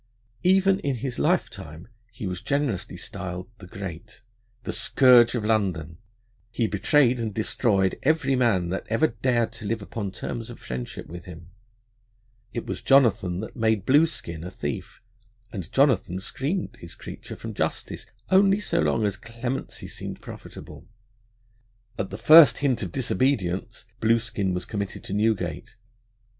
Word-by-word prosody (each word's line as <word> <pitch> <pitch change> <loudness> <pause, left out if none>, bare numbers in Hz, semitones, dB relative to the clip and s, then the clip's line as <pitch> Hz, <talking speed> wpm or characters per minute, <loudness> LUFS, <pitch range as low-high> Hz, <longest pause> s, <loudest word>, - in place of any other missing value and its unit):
Even 190 +1 +4
in 140 -7 -1
his 125 +1 -4
lifetime 80 +4 -1 0.2
he 110 -1 -7
was 90 -1 -4
generously 140 -9 -1
styled 90 +2 -5
the 90 - -11
Great. 100 +3 -8 0.4
The - - -4
scourge 125 -3 +5
of 110 -3 -2
London, 90 -8 0 0.5
he 115 0 0
betrayed 120 +5 +3
and 115 -2 -2
destroyed 100 -2 +1
every 155 -2 +2
man 105 -9 +2
that 95 - -3
ever 115 +8 +3
dared 120 0 0
to 115 -1 -10
live 110 +2 -1
upon 100 -1 -4
terms 115 +4 -5
of - - -10
friendship 60 -1 -6
with 85 +2 -9
him. 85 -1 -11 1.0
It 115 - -4
was - - -4
Jonathan 110 -9 +3
that 110 - -8
made 110 -4 +1
Blueskin 135 - +2
a 90 - -5
thief, 75 +1 -6 0.5
and 95 -6 -6
Jonathan 130 - +2
screened 145 - -3
his 85 - -9
creature - - -9
from - - -7
justice - - -3 0.2
only 195 +1 +5
so 170 -4 -1
long 115 -8 +2
as 100 - -1
clemency 120 +3 -5
seemed - - -7
profitable. - - -11 1.1
At 95 - -2
the 100 - -6
first 155 0 +8
hint 135 -4 +1
of 95 -5 -4
disobedience 110 -6 0
Blueskin 115 -3 +1
was 90 0 -3
committed 100 -3 -4
to - - -6
Newgate. 110 0 -1
110 Hz, 145 wpm, -25 LUFS, 95-130 Hz, 1.1 s, first